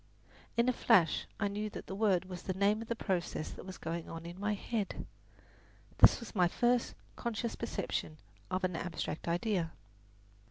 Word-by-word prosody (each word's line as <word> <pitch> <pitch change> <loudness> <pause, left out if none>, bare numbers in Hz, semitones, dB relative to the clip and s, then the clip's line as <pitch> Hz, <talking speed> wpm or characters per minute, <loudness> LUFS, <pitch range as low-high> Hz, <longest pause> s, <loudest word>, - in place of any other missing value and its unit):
In 235 +1 +4
a 255 - +4
flash 170 -8 +4
I 205 - +2
knew 210 +1 -2
that - - -7
the - - -6
word 195 -3 +3
was 180 -1 -7
the 185 - -3
name 205 +3 +3
of 225 - -6
the 235 - -1
process 180 -7 -1
that - - -9
was 190 - -7
going 165 0 -4
on 165 0 -6
in 175 +2 -7
my 210 +1 +1
head. 210 0 -3 0.9
This - - +8
was 235 - -9
my 180 -5 +4
first 240 +6 +2 0.2
conscious 235 0 -2
perception 160 -5 -3 0.3
of 185 +1 -1
an 180 -2 +1
abstract 165 -2 -3
idea. 175 -1 0
190 Hz, 175 wpm, -34 LUFS, 175-220 Hz, 0.9 s, This